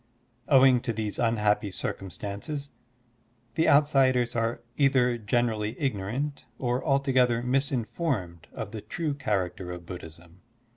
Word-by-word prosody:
Owing 130 -3 +6
to 115 - -2
these 105 -1 -3
unhappy 105 -3 +2
circtmistances, 100 - -5 0.8
the 160 - +2
outsiders 135 -5 +4
are 115 0 -1
either 130 -4 +3
generally 110 -1 0
ignorant 130 +3 -2
or 125 0 -1
alto 140 -2 +1
gether 125 -2 +3
misinformed 125 - -1
of 105 -2 -6
the 110 -1 -6
true 150 +8 -3
character 95 -8 -2
of 90 -1 -8
Buddhism. 85 0 -10
120 Hz, 115 wpm, -27 LUFS, 100-135 Hz, 0.8 s, Owing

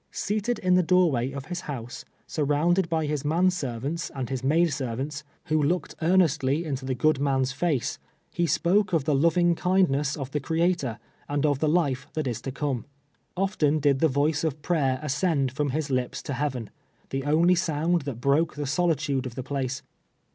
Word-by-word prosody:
Seated 215 +4 -1
in 185 -1 +1
the 180 - +5
doorway 160 -8 +2
of 140 -1 -6
his 175 +2 -5
house, 120 -3 -6 0.2
surrounded 160 +4 +1
by 160 -2 0
his 150 -1 -2
man 170 +5 +3
ser 135 -10 -3
vants 150 +8 -3
and 130 -2 -4
his 130 -1 -3
maid 160 +3 +3
servants, 135 +2 -4 0.2
who 155 0 +1
looded 175 +5 0
earnestly 160 -3 +2
into 135 -3 -3
the 130 -1 -1
good 155 +2 +2
man's 135 -2 +1
face, 140 -2 -1 0.3
he 170 0 0
spoke 185 +4 +2
of 160 -4 +2
the 150 - +2
loving 170 +4 +3
kindness 165 -6 +1
of 135 -2 -5
the 150 - -1
Creator, 160 -5 0 0.3
and 145 +1 0
of 145 -3 +2
the 155 - +2
life 140 -6 +1
that 155 -2 -2
is 120 -3 -3
to 135 - -4
come. 135 -3 -2 0.5
Often 180 -6 +1
did 140 -2 +3
the 160 - +4
voice 145 +2 +1
of 150 -2 -2
prayer 135 -7 +1
ascend 140 -2 +1
from 145 +2 -1
his 145 +1 -2
lips 125 -1 -1
to 140 - -4
heaven, 130 -5 -3 0.4
the 135 0 -2
only 160 +5 +4
sound 170 -1 +1
that 135 -5 -5
broke 140 +6 +2
the 145 -1 -3
solitude 145 -4 0
of 120 - -9
the 130 - -4
place. 130 -1 -3
145 Hz, 190 wpm, -26 LUFS, 135-170 Hz, 0.5 s, the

